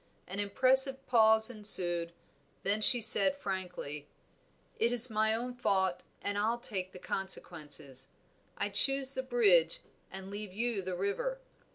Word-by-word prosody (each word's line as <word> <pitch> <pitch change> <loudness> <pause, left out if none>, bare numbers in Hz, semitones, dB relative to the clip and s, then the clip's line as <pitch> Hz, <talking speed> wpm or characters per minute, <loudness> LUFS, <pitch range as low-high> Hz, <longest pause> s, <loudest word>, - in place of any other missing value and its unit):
An 195 +2 -7
impressive 265 +6 +4
pause 220 -2 +4
ensued, 175 -6 +2 0.5
then 205 +2 +1
she 240 +2 +8
said 275 +5 +4
frankly 180 - -6 0.7
"It 235 - +1
is 245 0 -2
my 220 0 +1
own 245 +2 -5
fault 190 -7 0 0.2
and 205 0 -2
I'll 225 +3 0
take 190 -6 -5
the - - -12
consequences. 150 -9 -6 0.5
I - - -2
choose 270 +6 0
the 260 - -3
bridge 200 -11 +2 0.3
and 190 +1 -9
leave 205 -2 -7
you 230 0 -2
the 185 -1 -5
river. 200 - -3
205 Hz, 140 wpm, -31 LUFS, 185-240 Hz, 0.7 s, she